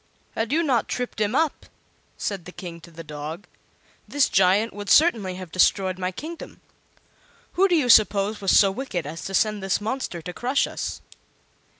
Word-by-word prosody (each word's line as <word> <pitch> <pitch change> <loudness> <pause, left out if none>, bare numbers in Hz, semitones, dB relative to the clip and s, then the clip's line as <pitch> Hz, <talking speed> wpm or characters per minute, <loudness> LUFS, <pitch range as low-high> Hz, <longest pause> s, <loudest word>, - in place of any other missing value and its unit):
"Had 225 +2 -2
you 325 +3 +2
not 255 -8 +1
tripped 245 -3 -4
him 210 +3 0
up," 320 0 0 0.5
said 195 -5 -4
the 180 - -9
King 175 -3 -9
to 170 - -14
the 165 0 -10
dog, 155 +4 -7 0.6
"this 285 -2 +2
giant 195 +4 +3
would 205 -1 -7
certainly 225 - +4
have 185 -3 -9
destroyed 185 +1 +2
my 185 0 -2
kingdom. 320 - -9 0.9
Who 390 +2 +3
do 360 - +2
you 295 -6 +2
suppose 210 -2 +4
was 195 - -1
so 195 -2 +5
wicked 195 - -4
as 160 +4 -7
to 195 - -3
send 210 +1 +1
this 195 0 0
monster 220 -4 -4
to 175 +2 -8
crush 255 +7 0
us?" - - -5
200 Hz, 180 wpm, -24 LUFS, 180-250 Hz, 0.9 s, so